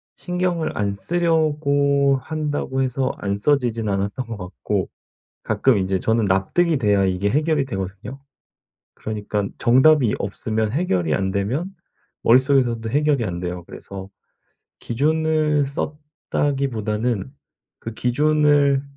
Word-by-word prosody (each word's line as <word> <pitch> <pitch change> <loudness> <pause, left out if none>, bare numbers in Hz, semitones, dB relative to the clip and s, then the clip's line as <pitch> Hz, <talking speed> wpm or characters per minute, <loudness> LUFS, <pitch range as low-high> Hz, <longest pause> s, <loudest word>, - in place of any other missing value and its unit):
신경을 180 -2 -2
안 100 -1 0
쓰려고 145 - +1
한다고 150 -3 -2
해서 130 0 0
안 100 0 -2
써지진 115 -1 0
않았던 100 +6 -2
것 115 -2 -6
같고 90 -9 -3 0.5
가끔 130 -5 +2
인제 95 -1 0
저는 110 +3 +1
납득이 125 - +1
돼야 105 -5 +2
이게 95 +2 0
해결이 150 +2 +1
되거든요. 95 +3 -6 0.7
그러니깐 105 -2 -3
정답이 130 0 +4
없으면 110 +2 -2
해결이 95 - 0
안 95 0 -1
되면 130 - -2 0.5
머릿속에서도 125 -2 +3
해결이 145 -1 +1
안 90 -3 -4
돼요. 90 0 -5
그래서 95 -1 -9 0.7
기준을 155 +2 +1
썼다기보다는 135 -6 -2 0.5
그 115 - -7
기준을 145 +2 +3
130 Hz, 270 characters per minute, -22 LUFS, 100-150 Hz, 0.7 s, 정답이